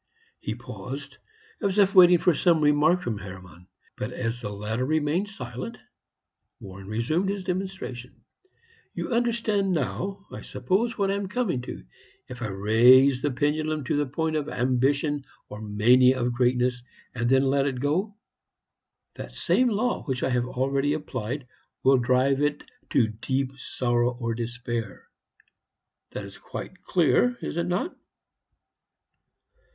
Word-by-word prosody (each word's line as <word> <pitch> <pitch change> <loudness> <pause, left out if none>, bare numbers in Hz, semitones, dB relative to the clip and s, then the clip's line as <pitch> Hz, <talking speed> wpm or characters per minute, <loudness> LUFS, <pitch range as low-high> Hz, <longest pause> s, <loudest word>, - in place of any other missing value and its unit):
He - - -4
paused, - - -8 0.4
as 200 -2 0
if 200 -1 +4
waiting 180 -1 +8
for 175 +1 +3
some 165 +2 +3
remark 150 +4 +3
from 110 -4 -3
Hermann; 90 -2 -11 0.3
but - - -4
as 115 +1 -3
the 105 - -4
latter 105 +4 -3
remained 155 +7 0
silent, 130 -9 -7 0.8
Warren 95 0 -10
resumed 135 - 0
his 200 -1 -3
demonstration. 180 -10 -5 0.7
"You - - -3
understand 230 -5 +1
now, 170 - -3
I - - -7
suppose, 225 +5 -1
what 195 -2 +1
I - - +1
am 200 -1 -2
coming 195 - -1
to. 60 - -8 0.4
If 125 -1 -9
I 115 - -1
raise 120 +7 +5
the 145 - +1
pendulum 150 +3 -1
to 125 - -1
the 145 -1 +1
point 160 +4 -2
of 150 -1 -2
Ambition 140 +4 +1 0.3
or 105 - -8
Mania 125 +5 +4
of 120 0 0
Greatness, 125 0 +1 0.3
and 120 -1 -1
then 135 +1 +4
let 135 +1 +2
it 130 -3 -2
go, 180 - 0 1.0
that - - -9
same 255 -1 +2
law 235 +3 0
which 130 -3 -2
I 130 - +1
have 125 0 +1
already 135 +3 0
applied 135 -3 -4 0.4
will 135 -1 +5
drive 130 +3 +2
it 145 0 0 0.3
to 130 -5 +3
Deep 130 +5 -2
Sorrow 120 -1 0
or 115 -2 -1
Despair. 120 -1 -5 1.0
That - - -5
is - - -12
quite - - -8
clear, 240 +8 +2
is - - -4
it 170 0 0
not?" 180 - -1
135 Hz, 145 wpm, -26 LUFS, 120-175 Hz, 1.0 s, waiting